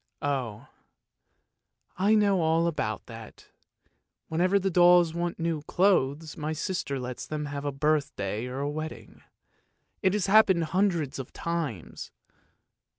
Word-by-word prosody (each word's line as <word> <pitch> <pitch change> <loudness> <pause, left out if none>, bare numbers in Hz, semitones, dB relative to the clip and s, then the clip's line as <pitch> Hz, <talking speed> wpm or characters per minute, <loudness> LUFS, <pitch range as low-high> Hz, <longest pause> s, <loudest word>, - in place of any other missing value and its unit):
" - - -53
Oh, 130 -7 -2 1.3
I 200 +4 +3
know 200 -4 +3
all 165 +1 +2
about 110 - -2
that; 115 -2 -12 0.8
whenever 180 +5 +2
the 195 0 0
dolls 175 -1 +5
want 170 0 -2
new 165 -2 -2
clothes 155 -4 +1
my 155 -1 -3
sister 155 -4 -3
lets 125 0 -6
them 150 -1 -3
have 145 0 -5
a 145 - 0
birthday 135 -7 -1
or 130 +2 -5
a 145 - -1
wedding. 155 +1 -7 0.8
It 190 -2 +2
has 210 -3 0
happened 195 -4 +5
hundreds 170 -5 0
of 130 - -7
times! 160 - -4
160 Hz, 135 wpm, -27 LUFS, 140-180 Hz, 1.3 s, dolls